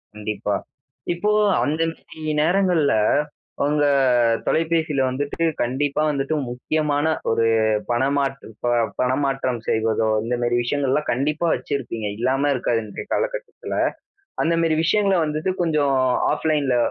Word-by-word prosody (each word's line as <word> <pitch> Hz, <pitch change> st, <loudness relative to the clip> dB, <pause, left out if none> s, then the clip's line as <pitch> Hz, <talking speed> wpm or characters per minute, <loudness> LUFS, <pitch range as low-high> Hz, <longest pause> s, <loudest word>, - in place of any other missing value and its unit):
கண்டிப்பா. 105 Hz, -1 st, -3 dB, 0.6 s
இப்போ 190 Hz, +5 st, -1 dB, 0.4 s
அந்த 155 Hz, +3 st, -1 dB
மாதிரி 160 Hz, -1 st, -13 dB, 0.2 s
நேரங்கள்ல 175 Hz, -3 st, +2 dB, 0.7 s
உங்க 150 Hz, 0 st, +2 dB, 0.6 s
தொலைபேசியில 160 Hz, -3 st, +1 dB
வந்துட்டு, 140 Hz, +4 st, -3 dB, 0.2 s
கண்டிப்பா 140 Hz, +4 st, 0 dB
வந்துட்டு 140 Hz, +1 st, -1 dB
முக்கியமான 145 Hz, +4 st, -1 dB, 0.3 s
ஒரு 115 Hz, 0 st, +2 dB, 0.5 s
பணமாற்று 135 Hz, +2 st, 0 dB, 0.2 s
ப -, -, +2 dB, 0.3 s
பணமாற்றம் 130 Hz, -1 st, 0 dB
செய்வதோ, 110 Hz, 0 st, +1 dB, 0.2 s
இந்த 120 Hz, +2 st, -1 dB
மாதிரி 120 Hz, 0 st, +1 dB
விஷயங்கள்லாம் 140 Hz, +3 st, 0 dB
கண்டிப்பா 150 Hz, +6 st, 0 dB
வச்சிருப்பீங்க. 120 Hz, -6 st, -4 dB
இல்லாம 135 Hz, +4 st, +1 dB
இருக்காது, 120 Hz, -2 st, 0 dB
இன்றைய 105 Hz, -, -7 dB
காலகட்டத்துல. -, -, -3 dB, 0.7 s
அந்த 165 Hz, +1 st, +1 dB
மாதிரி 160 Hz, -1 st, +2 dB
விஷயங்கள 195 Hz, +1 st, +2 dB
வந்துட்டு, 155 Hz, +4 st, -1 dB
கொஞ்சம் 150 Hz, -4 st, +1 dB, 0.4 s
ஆஃப்லைன்ல 150 Hz, -4 st, +1 dB
145 Hz, 110 wpm, -22 LUFS, 125-160 Hz, 0.7 s, நேரங்கள்ல